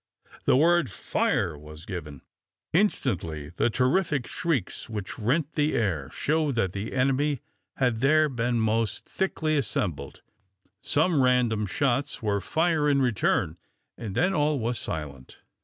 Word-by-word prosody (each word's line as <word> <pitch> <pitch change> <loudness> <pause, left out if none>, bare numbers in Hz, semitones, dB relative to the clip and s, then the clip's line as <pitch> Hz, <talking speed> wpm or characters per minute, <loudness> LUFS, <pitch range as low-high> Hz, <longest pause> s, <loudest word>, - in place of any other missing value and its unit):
The - - +5
word 170 -1 +4
"fire!" 85 -3 0
was 75 +2 -12
given. 75 -8 -7 0.5
Instantly 90 - 0
the - - +3
terrific 130 - +1
shrieks 145 - -2
which 105 0 -5
rent 140 +8 0
the 150 0 +1
air 85 -11 0
showed 155 -3 0
that 95 -6 0
the 100 +2 -4
enemy 135 +1 +1 0.3
had 125 -4 +1
there 155 +4 +4
most 115 -3 0
thickly 155 -5 0
assembled. 80 - -3 0.6
Some 155 -1 +2
random 120 -5 +2
shots 135 +5 0
were 100 -2 0
fire 160 - +1
in 140 -1 +3
return, 95 - +1 0.4
and 105 -4 -6
then 180 +3 +2
all 150 -2 +2
was 120 0 -2
silent. 70 -5 -6
125 Hz, 130 wpm, -27 LUFS, 100-150 Hz, 0.6 s, The